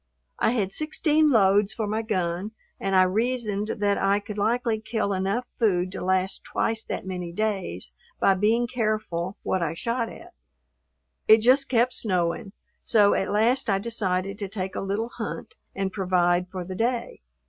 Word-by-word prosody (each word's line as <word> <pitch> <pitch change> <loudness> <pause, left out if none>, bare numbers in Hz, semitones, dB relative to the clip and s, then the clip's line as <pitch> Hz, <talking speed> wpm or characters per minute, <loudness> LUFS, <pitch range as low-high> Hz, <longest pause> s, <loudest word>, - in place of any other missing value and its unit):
I 225 - +2
had 200 -6 0
sixteen 310 - +2
loads 205 -3 +4
for 220 - -2
my 215 +2 -1
gun 185 -1 -2 0.3
and 195 0 -1
I 185 - +7
reasoned 215 +1 -1
that 205 -1 +1
I 200 +1 +2
could 210 0 -7
likely 225 +1 +1
kill 220 -2 -1
enough 195 +6 -1
food 185 -5 +2
to - - -6
last 185 +1 0
twice 225 0 -1
that - - -4
many 180 -2 -5
days 190 - -3 0.3
by 195 - +4
being 220 +5 +2
careful 215 -7 -2
what 190 - 0
I 165 -1 -1
shot 230 +5 -2
at. - - -12 0.9
It 220 0 +7
just 260 +4 +4
kept 245 0 +2
snowing, 185 -3 -1 0.3
so 205 -3 +4
at 190 - 0
last 230 +5 +2
I 195 - +3
decided 195 -3 -2
to 200 -2 -4
take 190 -2 -4
a - - -2
little 200 +4 -2
hunt - - -5 0.2
and 195 -1 -1
provide 180 -2 +1
for 185 -1 -5
the 185 - -6
day. 235 +4 -2
205 Hz, 170 wpm, -25 LUFS, 185-225 Hz, 0.9 s, I